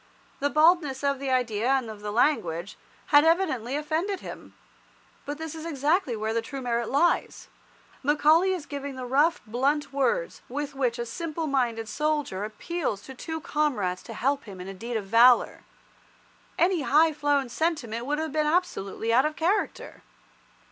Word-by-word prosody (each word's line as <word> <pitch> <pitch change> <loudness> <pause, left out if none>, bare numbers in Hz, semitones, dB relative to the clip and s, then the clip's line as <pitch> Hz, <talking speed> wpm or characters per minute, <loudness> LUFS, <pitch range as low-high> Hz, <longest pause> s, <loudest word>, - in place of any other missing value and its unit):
The 285 - +1
baldness 305 -3 +3
of 280 -1 +1
the 275 -1 -3
idea 240 -3 0
and 265 -3 +2
of 215 -2 -9
the 210 0 -4
language 205 - 0 0.4
had 290 0 +8
evidently 320 -8 +1
offended 320 +7 -1
him. - - -10 0.7
But 290 +1 -4
this 320 -1 -6
is 320 -1 -8
exactly 300 -2 0
where 220 +1 -2
the 230 - 0
true 270 +4 -7
merit 235 -2 -1
lies. 315 +6 +1 0.5
Macaulay 305 +6 +4
is 360 -5 -3
giving 280 -1 -6
the 255 -1 -6
rough, 290 +7 +2
blunt 280 +5 0
words 280 - 0
with 285 +2 -4
which 255 -3 -1
a 235 - -3
simple 320 +6 -4
minded 240 -6 0
soldier 295 -5 -1
appeals 215 - -3
to 265 - -9
two 320 +5 -5
comrades 235 -14 -1
to - - -9
help 275 +2 0
him 195 -4 -10
in 180 - -7
a 195 - -6
deed 230 +5 -4
of 210 - -5
valour. 235 +4 +5 1.0
Any 350 -1 +2
high 310 +3 +4
flown 290 -2 +1
sentiment 245 -5 -2
would 295 +1 0
have 315 -1 -3
been 305 0 +1
absolutely 265 - -1
out 260 +5 +5
of 305 - -6
character. 370 +6 -1
280 Hz, 170 wpm, -26 LUFS, 235-310 Hz, 1.0 s, had